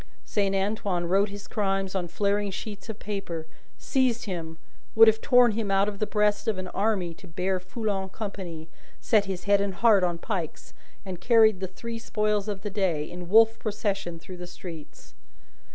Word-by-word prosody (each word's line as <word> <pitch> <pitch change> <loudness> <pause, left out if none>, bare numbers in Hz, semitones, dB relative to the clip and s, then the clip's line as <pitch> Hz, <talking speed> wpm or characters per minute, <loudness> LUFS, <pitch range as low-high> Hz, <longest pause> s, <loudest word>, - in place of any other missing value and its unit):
Saint 200 -2 0
Antoine 195 -3 -1
wrote 195 +4 +2
his 205 0 -9
crimes 195 -2 -1
on 185 -2 -2
flaring 200 +3 0
sheets 205 +2 -7
of 220 - -5
paper, 195 -7 -5 0.3
seized 255 -3 +1
him 165 -5 -5 0.4
would 225 0 +9
have 220 0 +4
torn 245 -3 +5
him 215 -1 -2
out 195 +1 +3
of 205 -1 -4
the 215 - 0
breast 210 +1 +1
of 215 -3 +1
an 185 0 -5
army 195 -4 0
to 185 - -15
bear 185 +2 -1
Foulon 195 0 -3
company 185 -6 -6 0.3
set 215 -4 +3
his 190 -2 -4
head 200 0 +3
and 200 -2 -2
heart 210 -1 +5
on 175 -1 +1
pikes, 175 -3 -5 0.3
and 180 -2 -6
carried 220 -3 +5
the 190 - -3
three 230 +5 -7
spoils 210 -2 0
of 200 -2 -3
the 205 0 -5
day, 185 -7 0
in 175 -1 -8
Wolf 225 +2 +6
procession 200 -5 -2
through 180 +2 -10
the 175 0 -7
streets. 170 -3 -10
200 Hz, 185 wpm, -27 LUFS, 185-215 Hz, 0.4 s, would